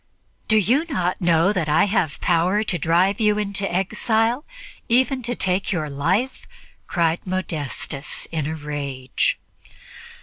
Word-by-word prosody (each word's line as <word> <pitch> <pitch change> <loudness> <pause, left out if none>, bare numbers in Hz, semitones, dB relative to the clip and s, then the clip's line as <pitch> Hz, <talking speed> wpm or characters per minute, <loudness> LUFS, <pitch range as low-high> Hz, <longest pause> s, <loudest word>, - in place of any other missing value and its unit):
"Do 220 - +4
you 245 - +3
not 180 - -1
know 170 +2 +3
that 175 -6 -1
I 150 - +4
have 185 -7 0
power 180 +5 +2
to 180 -5 0
drive 175 +6 +2
you 210 -1 +3
into 200 -1 -2
exile, 220 - 0 0.4
even 255 +2 +3
to 245 +1 -3
take 185 0 0
your 155 -6 -2
life?" 185 - -1 0.4
cried 170 +1 0
Modestus 150 -6 -4
in 155 -3 -2
a 160 - -3
rage. 140 -4 -2
185 Hz, 135 wpm, -22 LUFS, 160-210 Hz, 0.4 s, Do